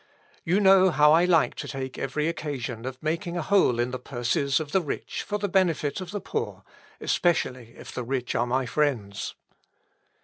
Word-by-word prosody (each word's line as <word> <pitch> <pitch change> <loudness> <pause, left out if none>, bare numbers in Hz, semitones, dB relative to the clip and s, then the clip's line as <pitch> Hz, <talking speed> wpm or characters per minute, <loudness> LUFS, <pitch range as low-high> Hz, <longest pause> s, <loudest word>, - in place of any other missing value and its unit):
You 180 +5 +2
know 190 -1 +6
how 150 -3 +5
I 170 +2 +5
like 170 -4 +3
to - - -6
take 130 -1 -5
every 150 +3 -1
occasion 130 -7 -4
of 130 -1 -5
making 170 +2 -2
a 170 - -1
hole 185 -12 +3
in 120 +1 0
the 130 - -4
purses 130 +2 0
of 150 -2 -6
the 190 - +3
rich 150 - -4
for 210 - -3
the 205 0 -2
benefit 180 -4 +1
of 185 - -7
the 205 - -3
poor, - - -4 0.4
especially 130 -9 0
if - - -10
the 125 - -4
rich 125 0 -2
are 120 - +1
my 130 +2 0
friends." 120 -8 -1
150 Hz, 190 wpm, -26 LUFS, 125-175 Hz, 0.4 s, know